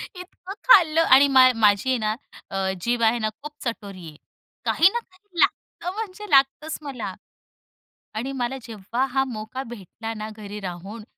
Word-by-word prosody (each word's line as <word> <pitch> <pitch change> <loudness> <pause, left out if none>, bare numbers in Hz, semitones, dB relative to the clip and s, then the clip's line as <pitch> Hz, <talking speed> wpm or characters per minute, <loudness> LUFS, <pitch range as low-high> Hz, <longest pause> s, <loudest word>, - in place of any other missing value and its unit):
इतकं 365 +1 -9
खाल्लं 330 -8 +7
आणि 280 -2 +7
मा 260 -2 +7
माझी 210 +2 +3
आहे 255 - +2
ना, 215 -1 0 0.7
जीभ 235 +3 0
आहे 225 +2 +3
ना 215 -1 0
खूप 300 +1 -7
चटोरी 200 -7 -5
आहे. 150 - -15 0.5
काही 360 - +5
ना 475 - 0
काही 375 -4 -14
लागतं 355 - 0
म्हणजे 420 -1 -6
लागतंच 275 +3 +3
मला. 245 -10 -5 1.0
आणि 245 +5 -3
मला 265 0 -2
जेव्हा 230 +3 -2
हा 265 0 +3
मोका 230 +2 -6
भेटला 225 +2 -7
ना 215 +1 -5
घरी 210 -1 -7
राहून. 195 +6 -8
245 Hz, 155 wpm, -24 LUFS, 215-310 Hz, 1.0 s, खाल्लं